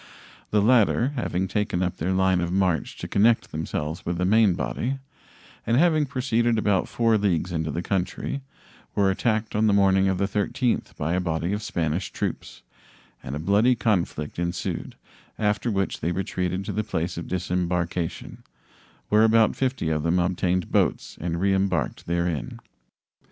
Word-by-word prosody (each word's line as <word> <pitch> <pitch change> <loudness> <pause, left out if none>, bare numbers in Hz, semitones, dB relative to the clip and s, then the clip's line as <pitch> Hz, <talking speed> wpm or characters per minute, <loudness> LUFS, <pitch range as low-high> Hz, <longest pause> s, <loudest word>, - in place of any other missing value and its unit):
The 105 -1 +2
latter, 120 +1 +4
having 95 -9 -2
taken 105 -1 -1
up 90 - -2
their 85 +4 -1
line 95 -1 +2
of 85 0 -2
march 90 -4 0
to - - -6
connect 115 +3 +3
themselves 80 +1 -4
with 85 0 -2
the 90 - 0
main 105 -1 +4
body, 130 +8 -2 0.7
and 115 +2 +1
having 155 -2 +3
proceeded 120 -3 +1
about 105 -3 +1
4 115 -2 +2
leagues 90 -3 0
into 80 -2 -2
the 85 +4 -3
country, 95 +9 -2 0.5
were 100 -1 +3
attacked 110 +2 -1
on 110 +1 +3
the 100 - +4
morning 95 -1 +4
of 95 -1 +1
the 100 - +1
13th 105 +5 -1
by 80 +3 -1
a 90 - +1
body 85 +1 -1
of 105 - -2
Spanish 85 -1 -2
troops, - - -5 0.6
and 65 - -5
a - - -3
bloody 105 +9 +3
conflict 90 -9 -1
ensued, 85 0 -3 0.4
after 105 +3 0
which 95 -3 -1
they 85 - -1
retreated 90 +1 -2
to - - -3
the 110 - -1
place 85 -4 -3
of 85 - -6
disembarkation, 90 -1 -2 0.7
where 105 +1 +5
about 110 0 +4
50 130 -10 -1
of 75 -1 0
them 85 +3 +1
obtained 90 0 0
boats - - +1
and 85 0 -2
reembarked 95 +1 0
therein. 85 -3 -2
95 Hz, 160 wpm, -25 LUFS, 85-110 Hz, 0.7 s, where